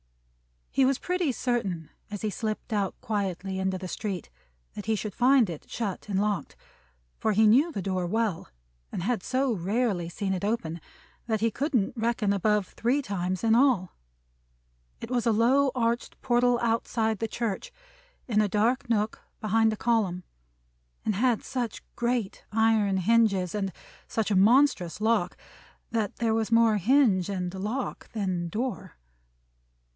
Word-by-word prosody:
He 270 Hz, -, +3 dB
was 270 Hz, 0 st, +2 dB
pretty 360 Hz, -5 st, 0 dB
certain 200 Hz, -11 st, -2 dB, 0.2 s
as 205 Hz, -2 st, -6 dB
he 215 Hz, -, -1 dB
slipped 220 Hz, +2 st, -4 dB
out 200 Hz, -2 st, -1 dB
quietly 195 Hz, -3 st, -2 dB
into 190 Hz, 0 st, 0 dB
the 185 Hz, 0 st, -6 dB
street 195 Hz, -5 st, -4 dB, 0.4 s
that 210 Hz, -, -7 dB
he 220 Hz, -, +2 dB
should 210 Hz, 0 st, -4 dB
find 255 Hz, -2 st, +4 dB
it 165 Hz, -4 st, -8 dB
shut 210 Hz, -5 st, -4 dB
and 195 Hz, -1 st, +1 dB
locked, 205 Hz, -2 st, -1 dB, 0.6 s
for 220 Hz, -, +1 dB
he 220 Hz, +2 st, +4 dB
knew 265 Hz, +11 st, +5 dB
the 200 Hz, -, -4 dB
door 185 Hz, -2 st, -1 dB
well, 215 Hz, -3 st, -1 dB, 0.4 s
and 175 Hz, -, -4 dB
had 235 Hz, 0 st, 0 dB
so 260 Hz, +5 st, 0 dB
rarely 200 Hz, -2 st, 0 dB
seen 190 Hz, +2 st, -2 dB
it 185 Hz, -, -3 dB
open, 175 Hz, -7 st, -2 dB, 0.5 s
that 220 Hz, -2 st, 0 dB
he 230 Hz, 0 st, +2 dB
couldn't 255 Hz, -5 st, 0 dB
reckon 225 Hz, -3 st, +1 dB
above 205 Hz, 0 st, +1 dB
three 255 Hz, +5 st, 0 dB
times 185 Hz, -3 st, -2 dB
in 225 Hz, -1 st, +4 dB
all. 235 Hz, -7 st, +3 dB, 1.1 s
It 230 Hz, -, -7 dB
was 245 Hz, -1 st, 0 dB
a -, -, +5 dB
low 260 Hz, +5 st, +3 dB
arched 235 Hz, 0 st, -1 dB
portal 245 Hz, -1 st, +3 dB
outside 225 Hz, -2 st, 0 dB
the 225 Hz, -, -1 dB
church, 230 Hz, -, -3 dB, 0.6 s
in 215 Hz, -2 st, +3 dB
a 210 Hz, -, +2 dB
dark 230 Hz, +6 st, +1 dB
nook 215 Hz, -1 st, 0 dB, 0.2 s
behind 220 Hz, +1 st, +3 dB
a -, -, -6 dB
column; 205 Hz, -7 st, 0 dB, 0.8 s
and 215 Hz, -, +1 dB
had 235 Hz, +2 st, +2 dB
such 245 Hz, -4 st, -4 dB
great 235 Hz, -4 st, -1 dB
iron 220 Hz, -3 st, +3 dB
hinges, 195 Hz, -2 st, +2 dB
and 195 Hz, -2 st, -2 dB, 0.4 s
such 220 Hz, -1 st, -1 dB
a -, -, +3 dB
monstrous 210 Hz, -, +4 dB
lock, 215 Hz, -5 st, +1 dB, 0.6 s
that 220 Hz, -3 st, -1 dB
there 230 Hz, -2 st, 0 dB
was 225 Hz, 0 st, 0 dB
more 230 Hz, -2 st, +5 dB
hinge 205 Hz, -4 st, +3 dB
and 180 Hz, -2 st, -3 dB
lock 215 Hz, +7 st, -4 dB
than 185 Hz, -5 st, -1 dB
door. 215 Hz, -2 st, -4 dB
220 Hz, 155 wpm, -27 LUFS, 195-235 Hz, 1.1 s, knew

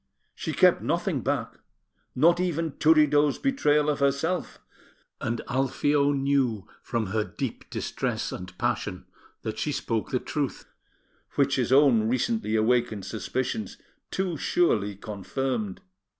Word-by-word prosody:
She -, -, -4 dB
kept -, -, +4 dB
nothing -, -, -1 dB
back, -, -, -2 dB, 0.6 s
not 170 Hz, +6 st, +4 dB
even 165 Hz, -3 st, 0 dB
Turiddu's 150 Hz, -2 st, +4 dB
betrayal 150 Hz, -, +2 dB
of 150 Hz, -2 st, 0 dB
herself, 140 Hz, +6 st, 0 dB, 0.6 s
and 115 Hz, +1 st, -2 dB
Alfio 140 Hz, +3 st, +2 dB
knew 135 Hz, -6 st, +1 dB
from 110 Hz, -5 st, -2 dB
her 110 Hz, -1 st, +2 dB
deep -, -, -6 dB
distress -, -, -3 dB
and 90 Hz, 0 st, -8 dB
passion 105 Hz, -6 st, -2 dB, 0.4 s
that 110 Hz, 0 st, -4 dB
she 150 Hz, -, -1 dB
spoke 115 Hz, -5 st, -2 dB
the 125 Hz, -, 0 dB
truth, 145 Hz, 0 st, -3 dB, 0.7 s
which 140 Hz, 0 st, +2 dB
his 125 Hz, -1 st, 0 dB
own 130 Hz, -6 st, +5 dB
recently 130 Hz, -, 0 dB
awakened 110 Hz, -2 st, +1 dB
suspicions 110 Hz, -2 st, -3 dB, 0.3 s
too 185 Hz, -4 st, -2 dB
surely 105 Hz, -, +1 dB
confirmed. 105 Hz, +2 st, -3 dB
130 Hz, 120 wpm, -27 LUFS, 110-150 Hz, 0.7 s, own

